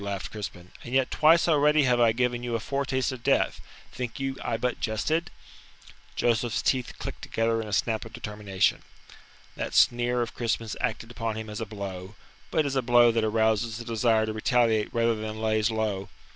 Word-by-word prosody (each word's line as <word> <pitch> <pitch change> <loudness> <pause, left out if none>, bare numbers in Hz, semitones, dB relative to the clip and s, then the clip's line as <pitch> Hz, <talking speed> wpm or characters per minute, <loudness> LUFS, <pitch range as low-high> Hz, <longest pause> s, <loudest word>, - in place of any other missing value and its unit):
laughed 100 -1 -4
Crispin, 95 -4 -7
"and 125 +2 -5
yet 135 -1 +2
twice 165 +3 +5
already 150 -1 +4
have 125 -2 +3
I 115 -1 +5
given 120 +1 0
you 120 -1 -2
a - - 0
foretaste 135 +1 -1
of 130 -2 -7
death. - - +1 0.3
Think 125 -1 -5
you 135 0 -2
I 115 - -1
but 125 +2 -2
jested?" 155 +11 -1 0.9
Joseph's 120 -1 +1
teeth 130 -2 0
clicked - - -7
together 115 0 0
in 110 - -7
a - - -7
snap 110 +1 0
of 115 - -11
determination. 105 -4 -1 0.7
That - - -4
sneer 120 0 +3
of 115 - -7
Crispin's 115 -1 -2
acted 115 -2 -2
upon 115 -2 -3
him 110 -1 -6
as 105 - -5
a 110 - -3
blow 100 -2 -7 0.3
but 155 - +1
as 140 -1 -2
a 130 - +2
blow 120 -1 +5
that 115 -1 0
arouses 110 +1 +1
the 120 - -7
desire 115 -1 +2
to 110 - -3
retaliate 110 -1 +2
rather 115 0 +2
than 110 0 -5
lays 110 0 +1
low. 110 -3 -2
115 Hz, 190 wpm, -27 LUFS, 110-125 Hz, 0.9 s, twice